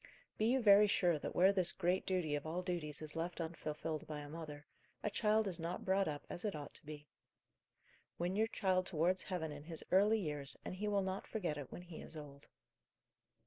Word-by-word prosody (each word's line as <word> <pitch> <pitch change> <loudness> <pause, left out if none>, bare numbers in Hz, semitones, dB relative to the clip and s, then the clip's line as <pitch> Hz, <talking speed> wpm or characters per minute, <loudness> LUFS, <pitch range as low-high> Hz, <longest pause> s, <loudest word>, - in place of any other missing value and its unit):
Be 215 - +3
you 255 +1 +3
very 205 0 +8
sure 175 -5 +3
that - - -5
where 190 +3 +6
this 185 -3 +3
great 185 +1 0
duty 180 -5 +1
of 145 +1 -2
all 175 +3 -2
duties 160 -5 -2
is 155 0 -4
left 170 +2 -3
unfulfilled 160 -2 -3
by 150 -1 -4
a 145 - -8
mother, 150 -2 -7 0.4
a 210 - 0
child 215 0 +3
is 180 -3 -2
not 170 +2 -3
brought 190 0 +3
up 145 -1 -4
as - - -3
it 210 -5 -1
ought 145 -2 -7
to - - -8
be. 150 -1 -8 1.1
Win 175 +2 -1
your 220 +2 +3
child 185 -4 +1
towards 180 +2 +2
heaven 170 -5 -3
in 145 0 -8
his 160 -1 -5
early 205 +4 +5
years, 150 -6 -2
and - - -3
he 210 +2 -2
will 200 -1 +2
not 190 +1 -3
forget 180 -9 -2
it 140 - -7
when 175 - -7
he 175 -2 -9
is 160 - -7
old. 140 -2 -10
175 Hz, 215 wpm, -37 LUFS, 155-190 Hz, 1.1 s, very